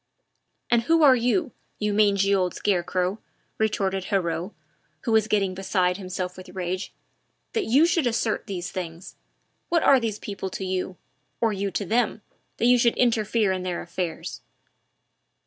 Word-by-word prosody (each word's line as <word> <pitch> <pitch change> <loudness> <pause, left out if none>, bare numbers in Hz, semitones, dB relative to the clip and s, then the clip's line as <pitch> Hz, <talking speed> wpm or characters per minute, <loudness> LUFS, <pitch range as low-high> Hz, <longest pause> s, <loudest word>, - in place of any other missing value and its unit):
"And 235 -1 +5
who 325 +6 +3
are 270 -3 +8
you 250 +5 +1 0.3
you 210 -1 -1
mangy 200 -1 +3
old 185 -2 +1
scarecrow?" 185 0 0 0.4
retorted 195 -3 0
Heriot, 175 -3 -1 0.5
who 235 - -2
was 220 -1 +4
getting 195 -3 +1
beside 185 -1 0
himself 185 -1 -5
with 185 0 -10
rage, 185 +1 -4 0.6
"that 445 - 0
you 275 +8 +5
should 335 -5 +2
assert 225 -1 -1
these 180 -3 -4
things? 175 -1 -6 0.5
What 335 -2 +2
are 270 - +6
those 225 -3 -2
people 200 -2 -5
to 190 - -5
you, 185 0 -3 0.4
or 225 -2 +2
you 200 0 -2
to 190 +2 -3
them, 220 +1 0 0.3
that - - 0
you 245 0 +6
should 235 0 +3
interfere 220 -3 +2
in 185 -1 -1
their 180 -1 -3
affairs?" 175 -1 -5
200 Hz, 155 wpm, -25 LUFS, 185-230 Hz, 0.6 s, are